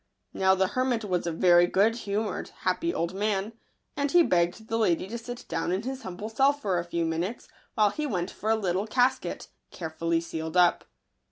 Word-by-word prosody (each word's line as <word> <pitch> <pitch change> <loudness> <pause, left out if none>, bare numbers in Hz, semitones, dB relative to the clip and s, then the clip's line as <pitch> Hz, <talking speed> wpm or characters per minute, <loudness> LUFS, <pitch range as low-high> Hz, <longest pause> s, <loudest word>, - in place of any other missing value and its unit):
Now 190 0 +3
the 190 0 +1
hermit 250 -2 0
was 180 -3 -1
a - - 0
very 175 +1 +5
good 205 +5 +3
humoured, 210 -1 -3
happy 335 +1 0
old 170 - -2
man; 205 +1 -1 0.4
and 285 0 0
he 345 +3 +6
begged 180 - 0
the 225 0 -1
lady 185 -4 +1
to 230 +4 -5
sit 245 +1 -8
down - - -2
in 190 +4 -1
his 265 +1 -5
humble 190 0 -6
cell 270 +6 +3
for 205 -11 -1
a - - -2
few 170 -1 -2
minutes, 170 +8 -3 0.3
while 210 -2 +4
he 300 +7 -3
went 180 -7 -2
for 215 - -4
a 225 - +4
little 195 -1 -1
casket, 255 +3 0 0.2
carefully 165 0 -2
sealed 160 0 -4
up. 175 -1 +4
200 Hz, 195 wpm, -27 LUFS, 175-230 Hz, 0.4 s, he